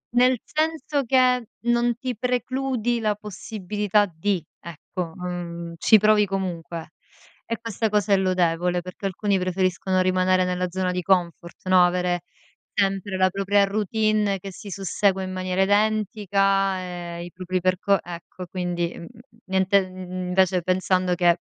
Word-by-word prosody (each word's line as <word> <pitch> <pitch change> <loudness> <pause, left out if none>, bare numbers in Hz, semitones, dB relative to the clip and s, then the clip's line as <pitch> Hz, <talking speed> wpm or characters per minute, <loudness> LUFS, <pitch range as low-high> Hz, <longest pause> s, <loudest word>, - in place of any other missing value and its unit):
Nel 250 +1 +5
senso 310 -2 -1
che 250 -1 +3 0.3
non 240 0 +2
ti 250 -1 -4
precludi 250 0 -1
la 215 -2 0
possibilità 210 0 -1
di, 175 0 -2 0.2
ecco, 170 0 -6
mhmm, 170 -2 -5
ci 220 - +6
provi 210 0 +4
comunque. 175 -4 -4 0.6
E 230 -1 -3
questa 225 -1 -2
cosa 210 -1 +2
è - - +6
lodevole, 180 -1 +1
perché 185 +2 -5
alcuni 195 +1 0
preferiscono 185 0 0
rimanere 185 0 +2
nella 180 0 -1
zona 185 0 -1
di 180 0 -2
comfort, 175 -1 -1
no 185 -1 +6
avere 180 0 +1 0.5
sempre 195 -1 0
la 185 0 +4
propria 200 +1 +2
routine 210 0 +1
che 195 +1 -8
si 200 - -10
sussegua 195 0 0
in 185 - -5
maniera 185 0 0
identica 200 -2 +1 0.4
e 170 - -6
i 175 - -10
propri 185 0 -3
perco 185 +2 +2
ecco 175 +1 -9
quindi 175 -2 -2
mhmm, 170 - -8 0.4
niente 190 +1 +2
invece 185 -1 0
pensando 185 0 +1
che 175 -1 +3
190 Hz, 140 wpm, -24 LUFS, 180-210 Hz, 0.6 s, ci